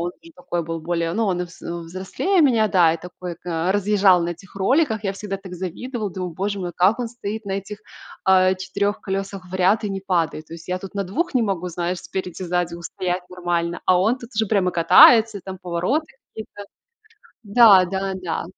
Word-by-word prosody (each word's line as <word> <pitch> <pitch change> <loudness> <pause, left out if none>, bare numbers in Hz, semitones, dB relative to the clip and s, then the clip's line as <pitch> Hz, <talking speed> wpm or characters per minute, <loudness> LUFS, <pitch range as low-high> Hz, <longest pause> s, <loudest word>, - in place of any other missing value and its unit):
он 175 +1 -2
уже 335 0 -15
такой 175 - -3
был 165 0 -4
более, 165 0 -2
ну, 225 +5 0
он 180 -3 0
и - - -3
вз 175 0 -15
взрослее 185 - -2
меня, 235 -8 +4
да, 170 -4 +4
и - - -3
такой 180 +1 -8
ка 170 0 -2
разъезжал 200 -3 +4
на 170 - -2
этих 175 +2 -11
роликах. 220 +1 +1
Я 195 - 0
всегда 195 0 -5
так 190 -1 -12
завидовала, 210 +5 -5
думаю: 180 0 -5
"Боже 200 +4 -3
мой, 175 -1 -4
как 190 +6 +3
он 240 - -2
стоит 220 -2 -6
на 195 - -4
этих, 200 +2 -5 0.5
а, 185 0 +4
4 200 +2 -2
колесах 195 -1 -4
в - - -7
ряд 190 +4 +2
и 205 - -2
не 195 - -4
падает?" 165 -5 -1
То - - -10
есть 165 +1 -12
я 180 0 -1
тут 195 +1 -10
на 200 -1 -1
2 290 - -2
не 250 - +3
могу, 185 -4 -2
знаешь, 175 +1 -3
спереди, 185 -1 -6
сзади 175 -1 -1
устоять 180 +1 -4
нормально, 175 -1 -2
а 185 -1 +5
он 220 +6 +2
тут 235 -1 -11
уже 220 0 +1
прямо 195 -3 +1
катается, 210 +5 +6
там 190 -1 -7
повороты 180 - -1 0.3
какие-то. 215 -2 -9 0.8
Да-да-да. 195 -4 +3
190 Hz, 200 wpm, -22 LUFS, 175-205 Hz, 0.8 s, катается